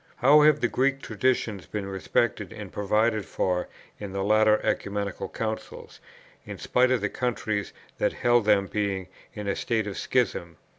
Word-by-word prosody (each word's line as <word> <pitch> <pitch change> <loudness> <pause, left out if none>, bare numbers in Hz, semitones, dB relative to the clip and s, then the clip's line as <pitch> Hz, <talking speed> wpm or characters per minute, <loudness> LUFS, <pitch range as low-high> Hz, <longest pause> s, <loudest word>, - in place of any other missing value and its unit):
How 145 +4 +6
have 150 0 +5
the 120 - +3
Greek 135 +3 0
traditions 110 -3 -1
been 105 -2 -4
respected 95 -1 -1
and - - -9
provided 110 +2 +1
for 90 -1 -1 0.3
in 100 -2 -6
the 95 0 -2
later 110 +1 +4
Ecumenical 100 -1 -2
Councils, 110 -1 -6 0.4
in - - -8
spite 125 +1 +2
of 130 -4 +1
the 105 - +1
countries 110 -4 -2 0.3
that - - +1
held 120 -2 +2
them 105 -2 +4
being 100 -2 -2 0.3
in 105 -1 -5
a 100 - 0
state 110 -3 -1
of 100 -2 -5
schism! 85 -10 -1
105 Hz, 160 wpm, -26 LUFS, 100-120 Hz, 0.4 s, How